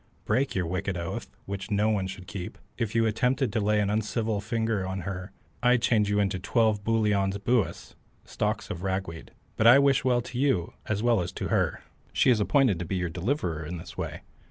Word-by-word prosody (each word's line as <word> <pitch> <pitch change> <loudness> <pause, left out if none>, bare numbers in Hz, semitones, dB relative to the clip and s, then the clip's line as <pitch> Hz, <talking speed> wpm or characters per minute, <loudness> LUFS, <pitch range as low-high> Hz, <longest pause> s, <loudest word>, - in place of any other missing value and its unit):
"Break 135 +2 +1
your 90 -2 0
wicked 95 +2 -2
oath, 85 -1 -4 0.2
which 100 0 -5
no 105 +1 +2
one 100 -3 0
should 95 -1 -8
keep. 90 -1 -6 0.2
If 115 -1 -3
you 115 0 +4
attempted 125 +2 +1
to 110 - +1
lay 105 0 +2
an 100 -1 +1
uncivil 110 0 -1
finger 110 -2 -1
on 95 0 -3
her 95 +1 -5 0.3
I'd 125 -1 +3
change 105 -3 +3
you 105 0 +2
into 95 -2 0
twelve 110 0 +1
booliaun 105 -3 +2
buis 120 -1 0 0.3
(stalks - - -2
of 85 - -5
ragweed), 95 -3 -3 0.3
but 110 - +4
I 120 +3 +9
wish 140 -1 +4
well 125 -2 +2
to 125 +1 -6
you 130 -12 +1
as 105 0 -1
well 120 -4 +3
as 85 - -3
to - - -4
her. - - 0 0.3
She - - +4
is 115 - +3
appointed 115 - +3
to 90 - -3
be 95 - -3
your 90 -2 -1
deliverer 90 - -2
in 85 +3 -5
this 85 0 -10
way. - - -5
105 Hz, 205 wpm, -27 LUFS, 95-115 Hz, 0.3 s, I